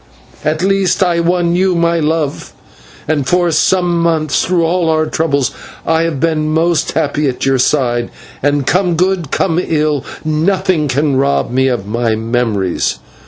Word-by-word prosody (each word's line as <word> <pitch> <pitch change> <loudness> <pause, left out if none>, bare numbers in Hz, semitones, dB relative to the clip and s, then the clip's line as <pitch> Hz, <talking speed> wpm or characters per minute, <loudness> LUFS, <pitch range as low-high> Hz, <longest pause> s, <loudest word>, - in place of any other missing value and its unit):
At 155 +1 0
the 175 - -1
least 195 -1 +2
I 175 -2 +1
won 170 0 +1
you, 185 0 +2
my 170 0 +1
love, 155 -2 -2 0.5
and 145 -4 0
for 175 -1 +2
some 175 +2 +2
months, 160 -5 +1
through 175 -2 +1
all 170 0 0
our 155 0 +2
troubles, 145 -5 0 0.3
I 160 0 +2
have 160 -5 -2
been 155 0 0 0.4
happy 150 -1 0
at 125 - -3
your 135 -1 +2
side, 120 -3 +1 0.3
and, 145 -1 +1
come 180 +1 +1
good, 180 -3 0
come 170 +1 0
ill, 150 -3 0 0.2
nothing 160 0 +1
can 140 +1 0
rob 140 -2 0
me 130 +1 +2
of 120 -7 -1
my 115 +1 -1
memories. 110 - -1
155 Hz, 160 wpm, -14 LUFS, 135-170 Hz, 0.5 s, least